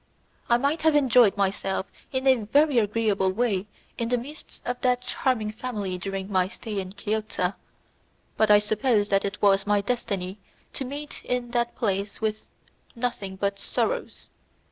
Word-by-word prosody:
I 235 - +6
might 280 +6 0
have 315 -1 +4
enjoyed 250 -7 +5
myself 195 -1 0 0.3
in 260 0 -1
a 265 - +7
very 270 +5 +3
agreeable 210 -3 +1
way 205 -2 0 0.3
in 230 -1 -1
the 245 - +2
midst 285 +6 -10
of 245 0 -3
that 250 -1 +2
charming 240 -5 0
family 210 -5 -4
during 195 +1 -4
my 185 -1 +3
stay 210 0 -5
in 190 0 -6
Chiozza, 205 -2 -1 0.8
but 220 -1 +3
I 210 - +9
suppose 210 0 +1
that 195 0 +2
it 200 +1 -4
was 195 0 +4
my 205 0 +4
destiny 200 -4 -2 0.3
to 270 - -4
meet 290 +3 -7
in 245 -1 -2
that 240 -1 0
place 200 -3 -1
with 215 -1 -2 0.5
nothing 230 -5 -3
but 200 +1 -1
sorrows. - - -2
215 Hz, 160 wpm, -26 LUFS, 200-245 Hz, 0.8 s, I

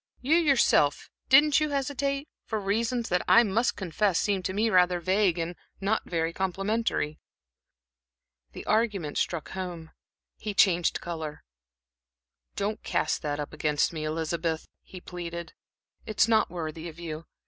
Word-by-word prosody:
"You, 280 +5 +2
yourself 270 - +3 0.2
didn't 290 +3 +6
you 305 0 0
hesitate 275 0 -1 0.2
for 220 - -3
reasons 225 +4 -1
that 180 0 +2
I 235 - +7
must 225 +3 +1
confess 190 0 0
seem 200 -2 0
to 185 - -2
me 215 +3 +1
rather 180 -1 +4
vague 185 0 +2
and 170 +1 -3 0.2
not 205 +3 -1
very 165 -1 -1
complimentary." 190 -4 -1 1.3
The - - -8
argument 210 -8 0
struck 170 -3 -2
home. 175 -4 -6 0.5
He 210 -1 -4
changed 175 -3 +3
color. 160 -3 -6 1.1
"Don't 205 +2 -2
cast 155 - 0
that 145 -1 -2
up 145 - -5
against 150 +1 +1
me, 155 -1 -4
Elizabeth," 160 +1 -2
he 185 - -11
pleaded. 170 -1 -7 0.5
"It's 215 0 +3
not 220 -1 +3
worthy 165 -1 -5
of 160 - -13
you. 165 -1 -6
185 Hz, 140 wpm, -28 LUFS, 165-220 Hz, 1.3 s, I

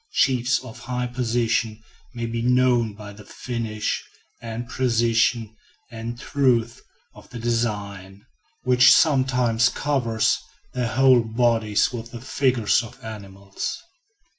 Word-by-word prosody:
Chiefs 130 -1 +2
of 115 -3 -11
high 125 0 -3
position 120 -2 -1 0.4
may 120 -1 -3
be 115 0 -3
known 125 -3 +2
by 105 -1 -10
the 105 +1 -13
finish 110 -2 -4 0.4
and 115 +1 -6
precision 115 -2 +1 0.4
and 115 +1 -6
truth 120 -5 0 0.3
of - - -16
the 120 - -8
design, 105 -4 -3 0.4
which 125 0 +6
sometimes 125 -5 +3
covers 125 -6 0 0.3
their 125 -2 -1
whole 130 +1 +4
bodies 115 -1 +1
with 115 -1 -6
the 120 - -9
figures 125 -3 +1
of 115 - -11
animals. 100 -3 -6
115 Hz, 115 wpm, -23 LUFS, 110-125 Hz, 0.4 s, which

